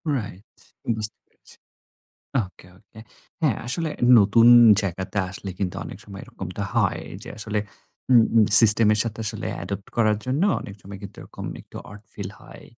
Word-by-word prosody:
Right, 100 -5 -6 0.5
বুঝতে 105 0 -2
পেরেছি। - - -22 0.9
ওকে, 90 - -19
ওকে। 105 +1 -20 0.4
হ্যাঁ, 140 -10 +1
আসলে 155 +5 -1 0.3
নতুন 115 +4 +4 0.3
জায়গাতে 95 +1 -4
আসলে 95 0 -8
কিন্তু 90 -2 -3
অনেক - - -10
সময় 100 -1 -11
এরকমটা 95 +1 -8
হয় 110 -5 0 0.2
যে, - - -10
আসলে 105 -1 -3 0.5
উম 115 -2 +6 0.4
সিস্টেম 110 0 +7
এর 105 - -2
সাথে 115 -1 -6
আসলে - - -5
অ্যাডপ্ট 100 0 -7
করার 110 -2 +2
জন্য 135 +7 -1 0.2
অনেক 100 - -10
সময় 100 0 -10
কিন্তু 100 0 -11
এরকম - - -11 0.2
একটু - - -15
ওড 105 0 -12
ফিল 100 -2 -7
হয়। - - -15
105 Hz, 155 wpm, -23 LUFS, 100-115 Hz, 0.9 s, সিস্টেম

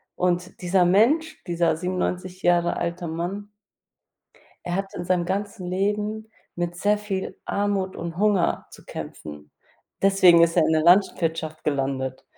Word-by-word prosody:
Und 180 0 -1
dieser 180 0 +3
Mensch, 285 - +2
dieser 170 -2 +1
97 180 +1 -3
Jahre 175 -1 +2
alter 170 0 -3
Mann 175 +6 -4 1.2
er 175 - -2
hat 195 0 -4
in - - -5
seinem 180 -1 +1
ganzen 195 +1 -3
Leben 210 +3 -2 0.2
mit 175 0 -3
sehr 205 +3 +2
viel 200 -2 -4
Armut 200 -2 -1
und 170 -1 -6
Hunger 200 -2 +1
zu - - -15
kämpfen. 75 -1 -9 0.5
Deswegen 185 -3 +6
ist 170 +1 +3
er 165 - +5
in 160 - +2
der 155 -1 +2
Landwirtschaft 165 -3 +2
gelandet. 135 -2 -2
180 Hz, 140 wpm, -24 LUFS, 170-195 Hz, 1.2 s, Deswegen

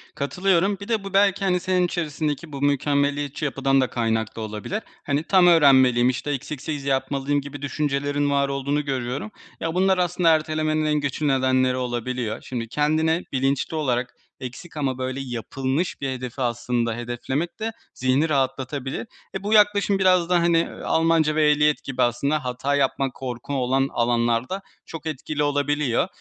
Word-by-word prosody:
Katılıyorum, 185 +7 +1
bir 200 - -7
de 225 -3 0
bu 195 0 -7
belki, 195 0 +3
hani, 180 -1 +2
senin 185 0 +1
içerisindeki 155 -2 -3
bu 140 -1 -6
mükemmeliyetçi 145 0 0
yapıdan 135 -1 +2
da 130 - 0
kaynaklı 110 -2 -1
olabilir. 110 - -4 0.2
Hani, 145 +2 0
tam 185 0 +4
öğrenmeliyim, 130 -7 +6
işte, 130 +3 -2
eksiksiz 145 +1 -4
yapmalıyım 140 +1 0
gibi 145 0 -9
düşüncelerin 145 0 -1
var 140 -1 +1
olduğunu 140 +2 -1
görüyorum. 135 - -3 0.3
Ya, 165 0 -2
bunlar 190 +1 +3
aslında 175 -1 +2
ertelemenin 155 -1 +1
en 150 0 +1
güçlü 145 +1 -2
nedenleri 130 -1 +2
olabiliyor. 120 -2 -3
Şimdi, 120 -3 -5
kendine 155 +5 +1
bilinçli 135 +3 0
olarak 125 -5 -1 0.3
eksik 135 +6 -8
ama 135 -3 -1
böyle 130 +1 -3
yapılmış 130 +6 -3
bir 135 - -1
hedefi 130 0 -5
aslında 120 -1 -1
hedeflemek 120 - -3
de 220 +1 -2 0.2
zihni 130 +5 +1
rahatlatabilir. 135 - -2 0.3
E, 190 - -4
bu 210 - 0
yaklaşım 205 -2 +4
biraz 185 -2 +3
da, 180 -1 +4
hani, 170 -1 +2 0.2
Almanca 160 -2 +2
ve 155 -1 +4
ehliyet 150 0 +2
gibi 130 -2 -3
aslında 135 +4 +1
hata 125 +3 -1
yapma, 135 -1 +1
korku 125 +1 -6
olan 135 0 +1
alanlarda 120 +8 0 0.2
çok 165 -1 -9
etkili 150 0 -3
olabiliyor. 145 -1 +1
145 Hz, 155 wpm, -23 LUFS, 130-160 Hz, 0.3 s, öğrenmeliyim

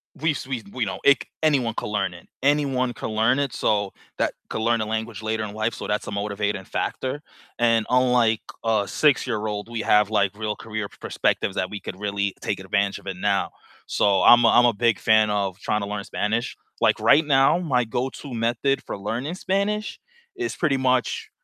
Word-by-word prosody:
we've 155 -1 0
we 125 -5 -3
we 125 -3 -1
know 95 - -4
it 140 - +5 0.2
anyone 135 -7 +2
can - - -4
learn 105 -4 -1
it, 85 - -14 0.2
anyone 135 -3 +1
can - - -5
learn 110 +5 +2
it, 140 -3 -1
so 100 -2 0 0.3
that - - +1 0.2
can 110 - -3
learn 115 0 +2
a - - -1
language 110 0 -4
later 110 0 -1
in 105 -1 -6
life, 110 +2 -1
so - - -6
that's 105 0 -2
a - - -4
motivating 100 -1 -2
factor. 130 +8 -3 0.4
And 115 -2 +3
unlike 125 -3 +3 0.2
a 110 -3 +1
6 150 -3 +2
year 110 -4 -2
old, 105 0 -4
we 120 -1 -4
have, 105 -1 +3
like, 105 -2 +1
real 105 -1 -2
career 110 -2 -5
perspectives 95 - 0
that 95 - -1
we 105 - -6
could 95 - -8
really 100 -1 -2
take 100 - -2
advantage 100 +1 -1
of - - -17
it 95 -1 -4
now. 100 +1 0 0.4
So 100 -2 +2
I'm 120 0 +7
a - - +6
I'm 120 - +6
a 120 - +4
big 115 +2 +1
fan 110 -1 +4
of 100 -3 -1
tryna 105 -1 -2
learn 100 -1 -4
Spanish. 110 +4 -2 0.3
Like, - - +3
right 155 +2 +5
now, 135 +1 +4
my 130 -8 +1
go-to 130 +4 -4
method 120 +4 0
for - - -5
learning 120 - -3
Spanish 200 +3 -1 0.4
is 370 0 -3
pretty 145 -5 +1
much, 130 -1 0
110 Hz, 200 wpm, -24 LUFS, 105-130 Hz, 0.4 s, I'm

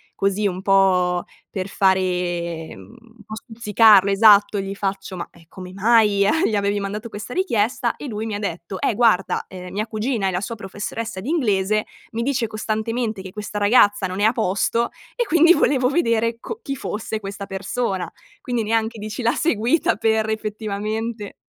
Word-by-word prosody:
così 200 +1 +1
un 185 -1 -4
po' 185 -2 +3 0.2
per 185 -1 -4
fare, 180 -4 0
mhmm 230 - -14 0.2
un 215 - -16
po' 215 - -7
stuzzicarlo, 220 -3 +4
esatto, 205 0 +5
gli 195 0 -4
faccio: 195 -1 -4
"Ma, 170 - -5
ehm, 170 - -19
come 185 -1 -10
mai 210 0 +3
gli 200 - +4
a 205 - +3
gli 215 - 0
avevi 200 0 0
mandato 205 +3 -5
questa 215 +4 -7
richiesta?" 245 - 0
E 290 - -7
lui 220 -2 -4
mi 220 -2 -3
ha - - -4
detto: 180 -1 -5
"Eh - - +1
guarda, 215 -5 +2
ehm, 180 -1 -9
mia 210 +3 -2
cugina 220 -1 -1
è - - 0
la 180 0 -2
sua 230 +3 -4
professoressa 205 +2 -6
di 235 - -5
inglese, 215 - +1 0.3
mi 230 +1 -2
dice 250 -3 0
costantemente 220 0 -3
che 190 -1 -9
questa 210 +1 -5
ragazza 205 -2 +4
non 185 +2 -4
è - - +4
a 220 - +5
posto, 225 +2 0 0.3
e 480 - +1
quindi 335 -2 +5
volevo 270 -5 +2
vedere 230 -6 +1
co 455 - -7
chi 275 - -3
fosse 220 -1 -4
questa 200 -1 -7
persona". 195 0 -3 0.3
Quindi 245 -2 -2
neanche 225 +1 0
dici 215 +3 -5
l'ha 235 +2 +3
seguita 260 0 +1
per 220 0 +1
effettivamente 215 0 -4
210 Hz, 180 wpm, -21 LUFS, 195-230 Hz, 0.3 s, esatto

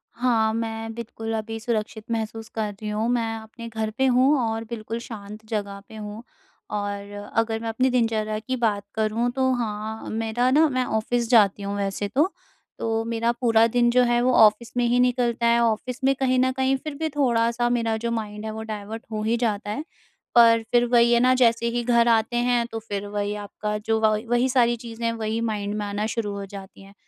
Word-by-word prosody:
हाँ, 225 -3 +2
मैं 225 0 -3
बिल्कुल 225 -1 -6
अभी 225 +1 -5
सुरक्षित 220 -1 -3
महसूस 225 0 -3
कर 215 -2 -1
रही 215 - -4
हूँ। 215 +2 -1
मैं 230 -2 0
अपने 225 +1 -10
घर 220 -1 -2
पे 265 - +3
हूँ 260 +3 +4
और 225 -1 -1
बिल्कुल 225 0 -5
शांत 215 -2 -9
जगह 200 -2 -3
पे 220 - -11
हूँ 210 +2 -7 0.5
और 205 0 -4 0.2
अगर 225 0 +1
मैं 230 - -4
अपनी 255 +4 +1
दिनचर्या 220 -3 0
की 245 +4 -3
बात 215 -5 0
करूँ, 220 +2 0
तो 260 0 +1
हाँ, 220 -2 -4
मेरा 225 +3 0
ना 310 +3 +5
मैं 255 -2 0
ऑफ़िस 235 +1 -1
जाती 205 -4 +4
हूँ 200 0 -3
वैसे 200 0 -2
तो। 290 - +1 0.5
तो 225 0 -1
मेरा 230 0 0
पूरा 225 -2 +5
दिन 240 +1 +2
जो 250 +1 +4
है, 240 0 +2
वो 255 +1 +2
ऑफ़िस 220 +1 +5
में 245 - +3
ही 245 +1 +2
निकलता 245 -1 +1
है। 235 0 +4
ऑफ़िस 235 +3 0
में 270 +1 +4
कहीं 255 -1 +2
न 260 0 +3
कहीं 265 0 +2
फ़िर 300 +3 -6
भी 315 +1 -2
थोड़ा-सा 240 -4 +1
मेरा 230 -2 +1
जो 235 +1 -3
माइंड 215 -2 -4
है, 220 - -3
वो 220 - -6
डायवर्ट 215 +1 -6
हो 215 -1 -2
ही 225 +2 +1
जाता 210 -3 -1
है। 290 +8 -3 0.5
पर 230 -1 +7
फ़िर 240 0 +4
वही 235 -1 +5
है 235 - +5
ना, 255 +1 +4
जैसे 235 -2 +3
ही 240 0 -1
घर 235 0 +3
आते 225 0 +2
हैं, 240 -1 +2
तो 225 - -4
फ़िर 205 -2 -5
वही 205 0 -2
आपका 210 +1 -4
जो 220 +1 0
व 215 -1 +4
वही 240 +1 +3
सारी 240 -2 +3
चीज़ें 230 0 -7
हैं, 230 - +2
वही 220 0 -2
माइंड 210 -2 -2
में 210 - -2
आना 205 +1 -2
शुरू 220 -2 -2
हो 200 0 -5
जाती 195 0 -11
हैं। 195 0 -15
225 Hz, 215 wpm, -24 LUFS, 215-240 Hz, 0.5 s, पर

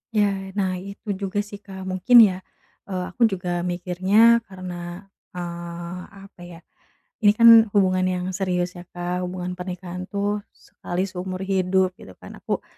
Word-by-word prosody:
Ya, 195 -2 0
nah 185 -3 -1
itu 200 +3 -7
juga 200 +1 -2
sih 205 -1 -10
Kak, 190 -2 -10
mungkin 190 +6 +6
ya, 185 -3 +2 0.5
eee, 185 -2 -3
aku 235 +4 +3
juga 180 -3 -3
mikirnya 185 +6 +3
karena, 180 -1 -7 0.3
eee, 175 0 -6 0.2
apa 195 -2 -16
ya, 170 -1 -11 0.6
ini 205 -2 +6
kan 230 0 +8
hubungan 185 -2 +3
yang 180 -1 -2
serius 180 -2 -1
ya - - -9
Kak, 180 +1 -4
hubungan 180 0 -5
pernikahan 180 0 -6
tuh 205 +1 -1 0.2
sekali 175 +1 -5
seumur 185 0 -5
hidup 190 -1 +1
gitu 95 - -12
kan, - - -11
aku - - -3
185 Hz, 150 wpm, -23 LUFS, 180-200 Hz, 0.6 s, kan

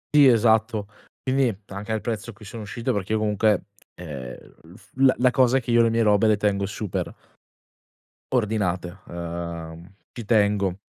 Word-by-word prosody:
Sì 145 -2 +8
esatto. 110 -3 +3 0.4
Quindi 130 -5 +1
anche 100 +3 -7
al 110 -1 -1
prezzo 115 -1 -4
a - - -7
cui 105 +2 -15
sono 110 +3 -8
uscito, 115 +3 -3
perché 100 +1 -2
io 110 - +2
comunque, 105 -1 +1 0.3
ehm, 70 -8 -9
l'uf 90 +7 -17 0.3
la 125 0 +3
cosa 130 0 +3
che 120 -1 -4
io 120 0 +5
le 115 - +4
mie 115 0 +2
robe 105 0 +4
le 105 -1 +4
tengo 100 -1 0
super 100 -1 -4 1.2
ordinate. 100 -6 -1
Uhm, 85 -1 -6 0.2
ci 120 - -8
tengo. 100 -4 +2
105 Hz, 160 wpm, -24 LUFS, 95-115 Hz, 1.2 s, Sì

